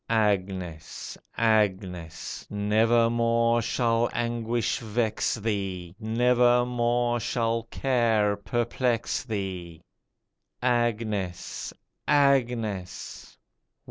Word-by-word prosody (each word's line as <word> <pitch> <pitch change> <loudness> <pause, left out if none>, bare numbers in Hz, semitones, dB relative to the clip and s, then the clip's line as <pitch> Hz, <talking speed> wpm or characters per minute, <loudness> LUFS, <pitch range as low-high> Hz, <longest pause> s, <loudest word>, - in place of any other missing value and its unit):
Agnes! 95 -7 -1 0.2
Agnes! 95 -7 0
Nevermore 115 +2 +2
shall 115 +1 +1
anguish 120 -1 -1
vex 110 -1 0
thee, 95 -6 -3
Nevermore 120 +1 +2
shall 115 0 0
care 115 -6 +2
perplex 120 +2 -1
thee. 95 -7 -5 0.8
Agnes! 115 -7 -1 0.4
Agnes 120 -9 0
115 Hz, 60 wpm, -27 LUFS, 100-120 Hz, 0.8 s, Nevermore